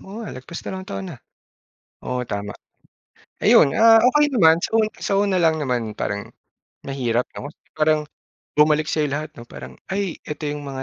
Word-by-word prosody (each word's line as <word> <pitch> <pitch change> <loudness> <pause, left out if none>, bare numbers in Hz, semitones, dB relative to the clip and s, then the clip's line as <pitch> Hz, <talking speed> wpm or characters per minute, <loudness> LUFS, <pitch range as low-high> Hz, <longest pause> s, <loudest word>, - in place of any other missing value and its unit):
oo 195 +2 -11
nga - - -7
lagpas 130 +6 -8
dalawang 190 0 -6
taon 95 -1 -5
na. - - -13 0.9
Oo, 125 0 -2
tama! 100 -2 -5 0.9
Ayun, 140 - +5
ah, 225 0 +7
okey 295 +2 +3
naman 165 -10 +6
sa - - -3
u - - +5 0.2
sa 200 - -2
una 200 -2 +1
lang 160 -3 +2
naman 120 -5 -2
parang 100 0 -4 0.5
mahirap 125 -3 -1
'no, 145 - -7 0.2
parang 155 0 +2 0.5
bumalik 150 0 +4
sa'yo 150 -2 0
lahat 150 +2 -4
'no, 120 0 -11
parang, 65 -1 -10
ay, 190 -2 -3
eto 150 0 -6
'yong 145 0 -3
mga 135 -2 -6
150 Hz, 170 wpm, -22 LUFS, 125-175 Hz, 0.9 s, ah